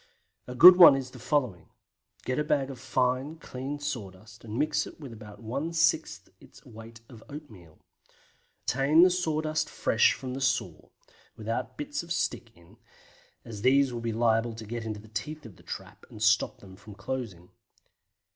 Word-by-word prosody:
A 125 - -7
good 180 +6 +10
one 170 -6 +10
is 130 -2 -5
the 125 - -12
following, 120 - -1
viz.: - - -38
Get 130 +3 -1
a - - +1
bag 140 -2 0
of 130 - -10
fine, 130 +3 -1
clean 140 -2 -6
sawdust, 110 -8 -7
and 110 0 -6
mix 150 +2 0
with 140 -6 -10
it - - -9
about 110 0 -12
one 140 +9 -3
sixth 165 0 +1
its - - -18
weight 115 0 -13
of 115 -4 -14
oatmeal. 110 - -12 0.9
Obtain 140 +6 +4
the 185 - +5
sawdust 155 -3 -1
fresh 110 - +2
from 130 - -8
under 125 - -4
the - - -2
saw, 130 -1 -2 0.5
without 115 +1 -4
bits 295 0 -4
of 170 0 -12
stick 170 -7 -2
in, 85 0 -20 0.7
as 105 -3 -8
these 135 +1 +3
would 120 - -5
be 115 0 -2
liable 115 0 +1
to 110 0 -9
get 115 +1 -5
into 110 -1 -5
the 110 - -15
teeth 150 +8 -6
of 100 -7 -12
the - - -18
trap - - -9
and 110 - -7
stop 110 -1 +2
them 95 -1 -13
from 105 +1 -13
closing. 100 -5 -6
125 Hz, 185 wpm, -28 LUFS, 110-145 Hz, 0.9 s, good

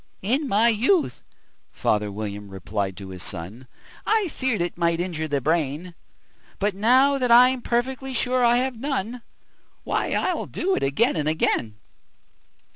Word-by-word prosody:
"In 265 +9 0
my 225 +1 +4
youth," 265 - +1 0.5
father 105 -1 0
William 105 0 -6
replied 95 0 -4
to 100 -2 -8
his 90 -1 -9
son, 100 +8 -7 0.4
"I 435 -5 +1
feared 260 -6 -1
it 175 0 -2
might 170 -1 0
injure 170 -3 -2
the 145 -2 -1
brain; 160 +3 -1 0.6
But, 205 0 0
now 260 +7 +4
that 250 -1 0
I'm 250 +2 +6
perfectly 260 +3 -2
sure 250 +1 +1
I 240 0 +5
have 255 -2 -1
none, 250 -3 -3 0.6
Why, - - -1
I - - 0
do 380 +2 -1
it - - -2
again 140 - +1
and 155 -2 0
again." 115 -8 0
200 Hz, 150 wpm, -24 LUFS, -, 0.6 s, I'm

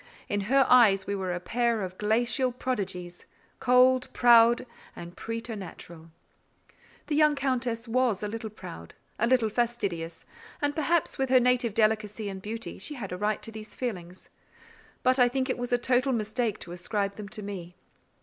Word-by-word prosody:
In 205 0 -1
her 270 0 +5
eyes, 210 -6 +5
we 200 - -2
were 190 -2 -3
a 175 - -2
pair 235 +2 0
of 185 0 -6
glacial 240 +4 +1
prodigies, 190 -8 -4 0.3
cold, 250 +1 +4
proud, 235 0 +6 0.3
and 175 +1 -9
preternatural. 195 -7 -7 1.0
The 300 - -2
young 300 0 +4
Countess 255 -4 -2
was 235 -4 +1
a - - -1
little 220 +1 -5
proud, 85 - -10 0.2
a 235 - +2
little 240 -3 +3
fastidious: 200 -8 -2 0.3
and 290 0 -1
perhaps, 325 0 0
with 265 -1 0
her 255 0 +6
native 245 -3 +2
delicacy 215 -1 +1
and 190 -1 -7
beauty, 225 +3 -6
she 300 - -4
had 205 -8 -6
a 180 - -4
right 210 +2 -1
to 225 - -5
these 215 -1 -9
feelings; 185 -7 -6 0.7
but 255 +1 +3
I 245 -1 +6
think 260 +1 -1
it - - -3
was 245 0 -4
a 245 - +4
total 255 +2 +1
mistake 220 0 -1
to 170 - -7
ascribe 200 +3 -2
them 210 -2 -7
to 210 0 -7
me. 180 -3 -7
225 Hz, 170 wpm, -28 LUFS, 200-250 Hz, 1.0 s, proud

